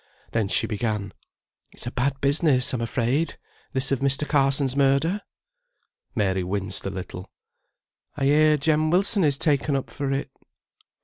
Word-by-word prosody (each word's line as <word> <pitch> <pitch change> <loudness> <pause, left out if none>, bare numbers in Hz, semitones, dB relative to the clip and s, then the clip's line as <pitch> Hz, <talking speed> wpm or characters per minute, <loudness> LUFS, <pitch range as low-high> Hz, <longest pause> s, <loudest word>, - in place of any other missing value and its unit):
Then 115 -3 0
she - - +2
began: 105 -2 -3 0.6
"It's - - -5
a 120 - -4
bad 135 +2 -1
business, 140 -2 +3
I'm 125 - -2
afraid, 125 +7 -1 0.4
this 130 0 +1
of 135 - +1
Mr. 140 +2 +1
Carson's 135 -2 +2
murder." 140 +8 +2 0.9
Mary 95 -4 0
winced 95 +1 -2
a - - -1
little. 95 -1 -7 0.9
"I 140 - 0
hear 150 +2 +4
Jem 155 +1 +1
Wilson 190 +3 +3
is 145 -3 +2
taken 145 -1 +1
up 135 - -3
for 140 -1 -3
it." 135 +1 -3
135 Hz, 145 wpm, -24 LUFS, 115-150 Hz, 0.9 s, hear